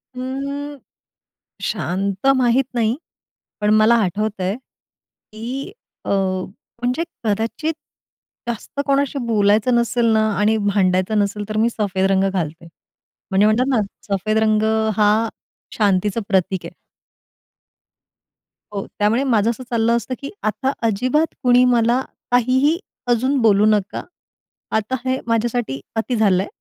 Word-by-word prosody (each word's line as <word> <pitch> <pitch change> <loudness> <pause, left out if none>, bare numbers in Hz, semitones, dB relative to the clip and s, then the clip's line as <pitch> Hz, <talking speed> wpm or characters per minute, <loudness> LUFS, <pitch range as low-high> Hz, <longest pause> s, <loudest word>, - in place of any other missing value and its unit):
हं, 280 +3 -4 0.9
शांत 195 +3 -2
माहित 250 +1 +3
नाही 230 0 +1 0.7
पण 210 - +2
मला 215 +2 +5
आठवतंय, 200 0 -1 0.8
की 250 - -5 0.3
अ, - - -4 0.7
म्हणजे 250 +7 0 0.2
कदाचित 225 +9 -1 0.8
जास्त 235 +4 -6
कोणाशी 280 0 +1
बोलायचं 215 +2 +3
नसेल 235 0 +1
ना 220 0 +3
आणि 215 +2 +3
भांडायचं 200 0 +1
नसेल 205 +1 -1
तर 215 - -2
मी 230 +2 +3
सफेद 195 -4 -1
रंग 190 0 +3
घालते. 165 -2 -4 0.6
म्हणजे 195 +2 +4
म्हणतात 225 +4 +3
ना, 240 -5 +2 0.3
सफेद 215 +3 0
रंग 215 -1 +3 0.4
हा 210 -1 +5 0.6
शांतीचं 205 +1 +1
प्रतीक 190 -1 +1
आहे. - - -8 2.0
हो, 200 - -3
त्यामुळे 220 +6 +2
माझं 230 -4 +2
असं 240 +2 -3
चाललं 230 0 +2
असतं 235 +3 -4
की 280 - -6
आता 260 +5 0 0.2
अजिबात 255 +10 +1
कुणी 250 0 +5
मला 235 +2 +3 0.3
काहीही 260 +6 +3 0.3
अजून 260 +4 +2
बोलू 210 -2 +4
नका. 210 -2 +1 0.7
आता 220 +4 0
हे 260 +1 0
माझ्यासाठी 230 - -1 0.2
अति 225 +3 -1
झालंय 200 -3 +2
220 Hz, 120 wpm, -20 LUFS, 205-250 Hz, 2.0 s, मला